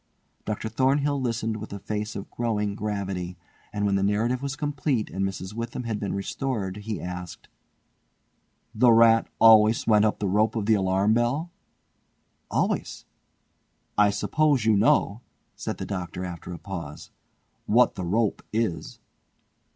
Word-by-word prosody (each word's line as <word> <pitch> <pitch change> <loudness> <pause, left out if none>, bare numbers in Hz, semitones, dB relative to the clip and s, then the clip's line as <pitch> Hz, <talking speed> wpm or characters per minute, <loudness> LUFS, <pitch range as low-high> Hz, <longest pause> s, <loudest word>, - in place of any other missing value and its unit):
Dr. 105 +1 -3
Thornhill 135 +5 +1
listened 115 -3 -2
with 110 0 -8
a 100 - -5
face 105 +1 -4
of 100 - -7
growing 105 -4 -1
gravity, 100 -4 -4 0.3
and 105 -1 -2
when 100 - +1
the 100 - +2
narrative 110 +6 +1
was 140 -1 -3
complete 145 -5 -1
and 95 +1 -2
Mrs. 95 0 -4
Witham 115 +2 -5
had 110 -3 -3
been 100 -2 -3
restored 105 -1 -3
he 105 +1 -5
asked: 90 0 -7 1.2
"The 125 -2 +5
rat 115 0 +5
always 110 0 +6
went 105 -1 +4
up 105 - +1
the 100 - -2
rope 105 +4 +2
of 110 -3 -1
the 110 - +4
alarm 95 +1 +2
bell?" 130 +9 0 1.0
"Always." - - -1 0.9
"I 105 0 +5
suppose 120 +6 +1
you 110 -1 +4
know," 105 +1 +2 0.3
said - - -5
the - - -5
Doctor 90 -1 -4
after 90 -1 -7
a 85 - -6
pause, 85 -4 -8 0.6
"what 125 +3 +4
the 95 - -5
rope 105 +5 0
is?" 110 -6 -2
105 Hz, 150 wpm, -26 LUFS, 100-115 Hz, 1.2 s, always